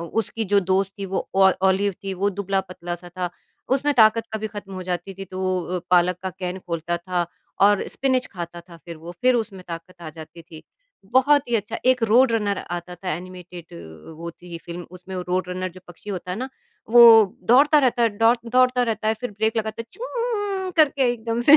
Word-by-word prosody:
उसकी 225 0 -1
जो 200 -1 +5
दोस्त 190 +1 0
थी 195 - -4
वो - - -2
ओ 195 0 +6 0.2
ओलिव 200 +1 +2
थी 195 -1 -3
वो 200 +2 0
दुबला 195 0 -1
पतला-सा 175 0 -6
था, 180 0 -4 0.4
उसमें 275 +3 +2
ताक़त 225 0 +5
कभी 220 0 -2
ख़त्म 205 -2 -9
हो 185 - -5
जाती 180 +1 -4
थी। 195 +1 -7
तो 185 0 -2 0.2
अ, - - -3
पालक 180 0 +4
का 190 - -3
कैन 180 0 -4
खोलता 170 0 -2
था 175 0 -2 0.4
और 205 0 +4
स्पिनच 260 -2 +1
खाता 175 -1 -6
था 170 0 -15
फ़िर 165 0 -10
वो। 165 +2 -9
फ़िर 255 0 +5
उसमें 220 -5 -3
ताक़त 165 +2 -8
आ 155 - -6
जाती 160 +1 -12
थी, 160 -1 -13 0.5
बहुत 280 +1 +4
ही 240 - 0
अच्छा 215 +1 -4
एक 255 -1 +3
रोड 230 +3 +5
रनर 205 -3 0
आता 175 0 -5
था 180 +1 -5
एनिमेटेड 180 0 -9 0.4
वो 170 0 -5
थी 170 0 -10
फ़िल्म 175 0 -7
उसमें 185 +1 -10
वो 180 - -3
रोड 180 0 0
रनर 185 0 -3
जो 185 - -12
पक्षी 175 +4 -10
होता 185 -1 -5
है 180 - -2
ना। 260 +2 -4 0.4
वो 240 0 +9 0.5
दौड़ता 295 +4 +6
रहता 250 -3 +2
है, 230 - +5
डौड़ 230 +2 +5
दौड़ता 255 0 +4
रहता 220 -2 -1
है 220 - +2
फ़िर 245 - -3
ब्रेक 220 +2 -1
लगाता 220 +1 -2
है - - -22
चूऊऊ 425 -6 -3
करके 280 -5 +4
एकदम 230 0 -3
से, 300 - +11
195 Hz, 210 wpm, -23 LUFS, 180-235 Hz, 0.5 s, से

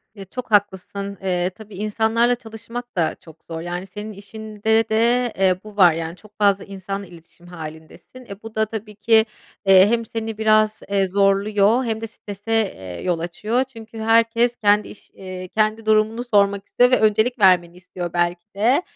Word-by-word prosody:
Iıı, 195 - -9
çok 245 +5 -8
haklısın. 200 0 0
Iıı, 180 -1 0
tabii 210 +1 -13
insanlarla 220 +4 +1
çalışmak 240 +1 -9
da 165 -3 0
çok 160 -2 -16
zor, 165 0 -5
yani, 175 +2 -5
senin 210 +3 -7
işinde 220 +2 -1
de, 235 +2 +2
eee, 185 -1 +2
bu 210 -1 -13
var, 180 -5 +7
yani, 165 +1 -4
çok 210 +1 -20
fazla 200 -1 +3
insanla 195 0 -6
iletişim 170 0 -17
hâlindesin. 160 +9 -11
E, 200 -2 -10
bu 225 -1 -10
da, 220 0 +2
tabii 215 -1 -7
ki, 220 +1 +4 0.4
eee, 190 0 +7
hem 230 0 0
seni 225 -1 -5
biraz, 215 0 +3
eee, 195 -1 +2
zorluyor 200 +4 +2
hem 220 -1 -2
de 225 - -4
strese, 205 0 -7 0.2
eee, 90 -2 -8
yol 175 -2 -1
açıyor. 210 +9 -1
Çünkü 225 -4 -12
herkes 230 +2 +3
kendi 210 -2 +2
iş - - -14
eee, 185 -1 -8
kendi 215 +3 0
durumunu 220 +2 +2
sormak 200 -4 +2
istiyor 245 +1 +3
ve 255 - +4
öncelik 220 +3 +2
vermeni 180 -3 +4
istiyor 180 -1 -7
belki 175 0 0
de. 240 - +3
210 Hz, 175 wpm, -21 LUFS, 185-225 Hz, 0.4 s, var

